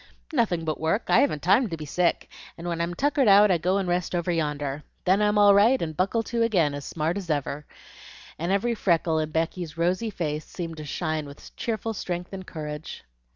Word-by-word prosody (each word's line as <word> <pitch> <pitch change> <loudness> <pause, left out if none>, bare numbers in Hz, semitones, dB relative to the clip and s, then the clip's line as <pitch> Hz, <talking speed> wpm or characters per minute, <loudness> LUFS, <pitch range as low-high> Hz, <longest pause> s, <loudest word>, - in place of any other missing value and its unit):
"Nothing 195 - +1
but 155 -1 -2
work; 160 +8 0
I - - +6
haven't 215 - +1
time 205 +6 +4
to 165 - -4
be 155 - -7
sick, 175 +4 0 0.3
and 170 +1 -7
when 170 -1 -2
I'm 170 +1 -2
tuckered 285 - +2
out, 205 0 +7
I 175 - +2
go 180 +4 +1
and 195 -2 -1
rest 175 0 -1
over 175 0 0
yonder. 150 -3 -2 0.2
Then 190 +3 +3
I'm 210 0 +2
all 205 -1 +7
right, 225 +6 +5
and 155 -2 -4
buckle 195 +6 +1
to 235 +1 -2
again, 180 -11 +2
as 145 -1 -6
smart 165 +3 -2
as 190 -4 -6
ever;" 145 0 -2 0.7
and 170 +3 -1
every 220 +5 +1
freckle 170 -6 +1
in 155 -1 -1
Becky's 165 0 -3
rosy 180 +7 0
face 155 -6 -3
seemed 165 -3 -6
to 155 - -7
shine 155 0 -2
with 140 +1 -13
cheerful 225 -1 -3
strength 180 -2 -5
and 190 -1 -7
courage. 150 -1 -7
175 Hz, 210 wpm, -26 LUFS, 155-200 Hz, 0.7 s, out